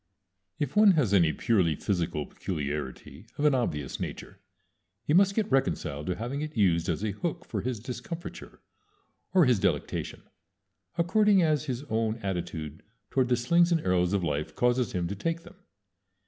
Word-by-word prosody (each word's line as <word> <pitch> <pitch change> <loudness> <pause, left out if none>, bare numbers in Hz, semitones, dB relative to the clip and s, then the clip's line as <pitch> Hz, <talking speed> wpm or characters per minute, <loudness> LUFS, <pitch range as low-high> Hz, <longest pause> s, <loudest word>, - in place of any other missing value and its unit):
If 145 -2 -3
one 210 -2 +7
has 130 - +2
any 85 -5 +5
purely 90 -5 +1
physical 85 -4 -2
peculiarity 75 - -5
of 145 - 0
an 150 - +5
obvious 75 - -2
nature, - - -6 0.6
he 150 - 0
must 195 +2 +5
get 220 -8 0
reconciled 80 - 0
to 90 - 0
having 120 +8 -4
it 155 -4 -5
used 85 -4 +2
as 85 +4 -1
a 105 - 0
hook 170 - -4
for - - -3
his 125 -3 -3
discomfiture, 135 +9 -8 0.7
or 180 -4 +7
his 125 -5 +3
delectation, 90 -7 -2 0.7
according 200 +2 +4
as 155 -2 +1
his 130 -2 -3
own 110 -5 -1
attitude 80 -5 -4 0.3
toward 130 -2 +2
the 125 - +3
slings 170 +8 +3
and 165 -2 +2
arrows 90 -4 +1
of 100 -3 +1
life 75 -2 -2
causes 125 -2 +1
him 90 -2 -1
to 100 - -4
take 165 +10 -2
them. 175 +2 -15
115 Hz, 165 wpm, -28 LUFS, -, 0.7 s, one